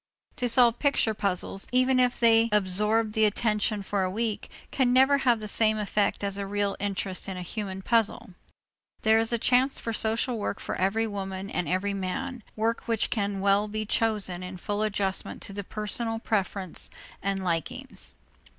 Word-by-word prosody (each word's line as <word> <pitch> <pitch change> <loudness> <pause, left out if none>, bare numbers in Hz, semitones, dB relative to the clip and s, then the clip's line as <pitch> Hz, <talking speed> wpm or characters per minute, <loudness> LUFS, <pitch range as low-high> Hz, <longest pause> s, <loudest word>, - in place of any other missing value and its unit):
To 245 - +1
solve 235 0 +5
picture 280 -6 +2
puzzles, 195 -1 -1
even 255 +1 +3
if 250 -1 +2
they 230 -1 +5
absorb 210 +2 +2
the 220 0 +4
attention 210 -1 0
for 200 0 -1
a 185 - 0
week, 220 +2 -3 0.2
can 255 -3 +2
never 265 +2 +5
have 240 -4 +2
the 215 - -6
same 215 +1 +3
effect 205 -1 0
as 200 0 -1
a 200 -1 -4
real 205 0 -1
interest 195 -1 -2
in 190 - -5
a 180 - -5
human 190 0 -5
puzzle. 230 0 +1 0.7
There 220 0 +5
is 225 +1 +1
a 235 - +2
chance 255 +4 +2
for 230 - -4
social 225 +2 0
work 205 - -3
for - - -4
every 205 +5 +1
woman 195 -2 -5
and 180 - -2
every 190 +2 0
man, 195 +7 -4
work 225 +1 -1
which 230 -2 +1
can 200 -3 -1
well 200 +1 +3
be 215 +1 -3
chosen 210 -5 0
in 185 0 -7
full 205 +3 -3
adjustment 200 -2 -1
to 200 - -5
the 200 0 -5
personal 220 +3 -2
preference 195 -5 -2 0.3
and 195 0 -1
likings. 165 -3 -3
210 Hz, 180 wpm, -27 LUFS, 195-230 Hz, 0.7 s, solve